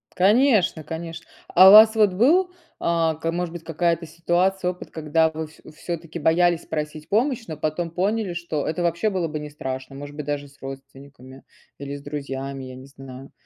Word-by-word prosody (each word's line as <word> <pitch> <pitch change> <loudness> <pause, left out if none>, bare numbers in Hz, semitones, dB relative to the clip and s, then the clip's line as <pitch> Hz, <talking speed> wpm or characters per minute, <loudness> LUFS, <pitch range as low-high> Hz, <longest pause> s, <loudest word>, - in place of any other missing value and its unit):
Конечно 205 - +3
конечно. 165 +2 -7 0.2
А 185 +2 +8
у - - +9
вас 220 +1 +9
вот 210 -4 +4
был, 340 - +3 0.3
а, 165 -2 +1
к 165 +1 -3
может 175 -1 -3
быть, 170 -1 -8
какая-то 165 +1 -1
ситуация, 180 +3 0
опыт, 180 - -12
когда 160 +1 +1
вы 160 0 -5
всё 155 - -20
всё-таки 170 0 -6
боялись 170 +2 +2
просить 150 0 -5
помощь, 235 +2 +1
но 155 -2 -6
потом 155 +3 -2
поняли, 195 +2 -1
что 170 -4 -3
это 165 +3 -2
вообще 170 +5 +1
было 185 -4 -1
бы 155 0 -5
не 150 0 -7
страшно. 130 -2 -6
Может 145 +1 -9
быть, 150 - -6
даже 145 0 -3
с 140 +1 -23
родственниками, 135 0 -11 0.4
или 140 0 -6
с 140 - -9
друзьями, 135 -2 -5
я 130 - -9
не 130 +1 -11
знаю. 135 -1 -12
160 Hz, 185 wpm, -23 LUFS, 145-180 Hz, 0.4 s, у